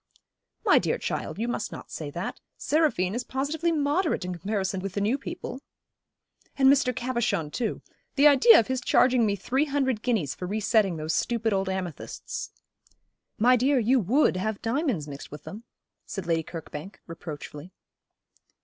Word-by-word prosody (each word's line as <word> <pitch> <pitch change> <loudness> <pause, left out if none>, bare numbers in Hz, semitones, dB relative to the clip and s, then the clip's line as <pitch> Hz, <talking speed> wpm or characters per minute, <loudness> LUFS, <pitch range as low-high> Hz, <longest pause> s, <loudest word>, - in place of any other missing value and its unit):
'My - - +6
dear - - 0
child, - - -4
you 230 +3 -2
must 240 - -3
not - - -9
say - - -5
that. - - -5 0.2
Seraphine 290 - +1
is 245 +2 -2
positively 295 +7 -1
moderate 305 - 0
in 180 - -3
comparison 190 +1 -2
with 195 -1 -5
the 200 - -1
new 210 +5 +2
people.' 270 -1 -6 1.0
'And 270 -1 +5
Mr. 265 -2 +2
Cabochon, 235 -11 -1
too. 235 +5 -3 0.3
The 285 +1 +4
idea 255 -6 +8
of 225 - +1
his 260 -1 -2
charging 245 -1 +4
me 200 - +1
three 260 +9 0
hundred 270 -6 0
guineas 215 - 0
for 180 - -6
re 210 +4 -2
setting 205 -3 +2
those 155 +1 -2
stupid 230 -2 0
old 195 -1 0
amethysts.' 185 -4 -5 0.9
'My 250 +4 +5
dear, 265 +3 +2
you 250 +2 +3
would 235 - +2
have 210 +2 -2
diamonds 235 - -1
mixed 140 -1 -8
with 150 - -10
them,' 220 +4 -9 0.4
said 195 -4 -5
Lady 165 -1 +1
Kirkbank, 160 +3 -8
reproachfully. 155 0 -8
225 Hz, 165 wpm, -27 LUFS, 185-260 Hz, 1.0 s, idea